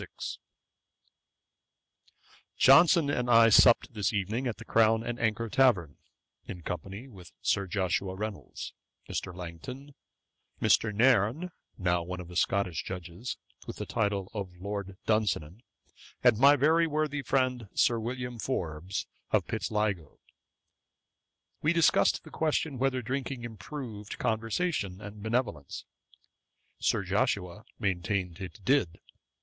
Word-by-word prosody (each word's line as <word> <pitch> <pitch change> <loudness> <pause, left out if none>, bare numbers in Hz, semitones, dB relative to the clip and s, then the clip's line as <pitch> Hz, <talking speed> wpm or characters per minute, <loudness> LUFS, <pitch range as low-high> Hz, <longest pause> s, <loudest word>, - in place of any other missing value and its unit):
Johnson 155 +3 +6
and 125 -3 -1
I 115 -1 +7
supt 120 +2 +6
this 105 -3 0
evening 110 +5 -1
at 120 - -3
the - - -11
Crown 115 0 +3
and 120 0 -4
Anchor 115 0 0
tavern, 100 - +2 0.5
in 85 - -7
company 95 +8 -6
with 95 -9 -13
Sir 100 -1 +1
Joshua 95 0 -1
Reynolds, 105 0 -6 0.3
Mr. - - -3
Langton, 90 - -8 0.7
Mr. 110 - +3
Nairne, 120 - +3 0.3
now 90 -2 +1
one 90 +2 -5
of 90 -1 -8
the 90 - -10
Scotch 90 -2 0
Judges, 90 +5 -6 0.3
with - - -5
the - - -5
title 100 -3 -1
of 95 -4 -6
Lord 100 -1 -5
Dunsinan, 105 -4 0 0.6
and 120 -3 +5
my 140 +2 +7
very 160 +4 +3
worthy 150 -1 -1
friend, 130 -3 0
Sir 120 -1 +3
William 125 +1 -4
Forbes, 90 - -3 0.2
of - - +2
Pitsligo. 105 -7 -2 1.4
We 155 +3 +3
discussed 170 -1 +3
the - - -13
question 155 -3 -1
whether 130 -1 0
drinking 130 +1 -3
improved 110 - -7
conversation 110 - -1
and 105 0 -9
benevolence. 110 - -2 0.9
Sir - - +1
Joshua 90 +4 -1
maintained 95 -2 -1
it 95 +2 -8
did. 130 -11 +2
110 Hz, 120 wpm, -29 LUFS, 95-125 Hz, 1.4 s, I